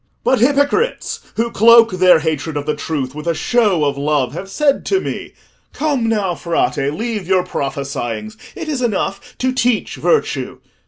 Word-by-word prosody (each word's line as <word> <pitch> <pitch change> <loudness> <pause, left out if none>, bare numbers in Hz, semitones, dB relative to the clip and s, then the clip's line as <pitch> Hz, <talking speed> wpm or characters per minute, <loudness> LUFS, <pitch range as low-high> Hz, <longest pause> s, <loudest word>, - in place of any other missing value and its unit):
"But 260 - +2
hypocrites 285 - +1 0.2
who 230 +1 -1
cloak 230 +1 +6
their 185 -1 +5
hatred 160 -1 -2
of 145 - -3
the 150 0 -1
truth 145 -4 -3
with 150 +2 -7
a 170 - +1
show 205 -10 +2
of 140 -1 -1
love 145 -3 0
have 195 +4 -7
said 280 +6 +1
to 385 - +2
me, - - -6 0.4
'Come 280 -7 0
now, 205 -5 0
Frate, 170 0 -1 0.2
leave 215 +2 -4
your 185 -1 +3
prophesyings: 130 -8 -4 0.2
it 330 - -6
is 290 -4 -2
enough 200 -4 -2
to 255 0 0
teach 245 -3 0
virtue. 465 - 0
195 Hz, 165 wpm, -18 LUFS, 150-245 Hz, 0.4 s, cloak